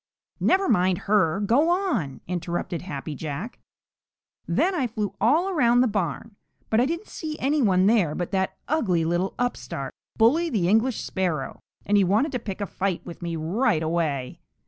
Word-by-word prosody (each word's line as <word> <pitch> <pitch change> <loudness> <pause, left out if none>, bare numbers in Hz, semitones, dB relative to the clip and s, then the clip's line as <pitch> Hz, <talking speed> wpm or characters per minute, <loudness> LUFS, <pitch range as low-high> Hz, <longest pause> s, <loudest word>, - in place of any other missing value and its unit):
"Never 385 +1 +3
mind 185 -5 +3
her; 195 -4 +2
go 250 +11 +3
on!" 320 - -1
interrupted 175 -1 -3
Happy 155 -4 -6
Jack. 155 - -6 0.9
"Then 385 - +2
I 280 -8 0
flew 215 -3 -3
all 310 +11 +3
around 245 -9 +3
the 255 - +4
barn, 200 +1 -3 0.3
but 220 +1 +4
I 255 - +2
didn't 335 +6 -3
see 310 -2 -6
any 290 +3 +1
one 190 -5 +3
there 200 -8 +3
but 175 - -3
that 190 -1 -1
ugly 190 - +1
little 175 +3 -1
upstart, 135 - -3 0.2
Bully 300 +10 +4
the 205 - 0
English 225 +5 +2
Sparrow, 175 -8 -2 0.3
and 205 +1 +3
he 200 - +5
wanted 215 - +2
to 250 - -2
pick 205 -3 -6
a - - 0
fight 195 -2 -3
with 170 0 -9
me 170 -1 -3
right 165 +2 +1
away." 155 -6 -1
200 Hz, 170 wpm, -25 LUFS, 170-250 Hz, 0.9 s, he